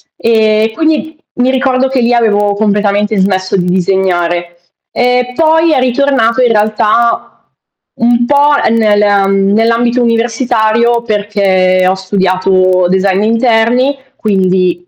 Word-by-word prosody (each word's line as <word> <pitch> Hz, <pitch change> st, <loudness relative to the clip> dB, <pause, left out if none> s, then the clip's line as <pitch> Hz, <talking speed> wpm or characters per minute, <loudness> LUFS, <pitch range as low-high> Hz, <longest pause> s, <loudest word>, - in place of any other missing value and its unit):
e 220 Hz, -1 st, +1 dB
quindi 315 Hz, +1 st, -2 dB, 0.2 s
mi 250 Hz, +1 st, 0 dB
ricordo 265 Hz, 0 st, 0 dB
che 265 Hz, -, -1 dB
lì 240 Hz, +1 st, +1 dB
avevo 205 Hz, -3 st, +1 dB
completamente 205 Hz, 0 st, -1 dB
smesso 190 Hz, 0 st, -1 dB
di 180 Hz, -, -1 dB
disegnare. 175 Hz, -2 st, -1 dB, 0.4 s
E 250 Hz, 0 st, -1 dB
poi 320 Hz, 0 st, +2 dB
è 275 Hz, -, +1 dB
ritornato 255 Hz, -2 st, 0 dB
in 245 Hz, -2 st, +2 dB
realtà 215 Hz, +2 st, -1 dB, 0.5 s
un 240 Hz, +1 st, +1 dB
po' 290 Hz, +2 st, +2 dB, 0.2 s
nel, 215 Hz, -2 st, +1 dB, 0.2 s
mhmm, 195 Hz, 0 st, 0 dB
nell'ambito 235 Hz, +2 st, +1 dB
universitario, 235 Hz, 0 st, 0 dB
perché 195 Hz, -4 st, 0 dB
ho 185 Hz, -, +2 dB
studiato 185 Hz, -1 st, 0 dB
design 190 Hz, +1 st, 0 dB
d'interni, 230 Hz, +4 st, +1 dB, 0.2 s
quindi 185 Hz, -3 st, -1 dB
220 Hz, 115 wpm, -11 LUFS, 190-240 Hz, 0.5 s, poi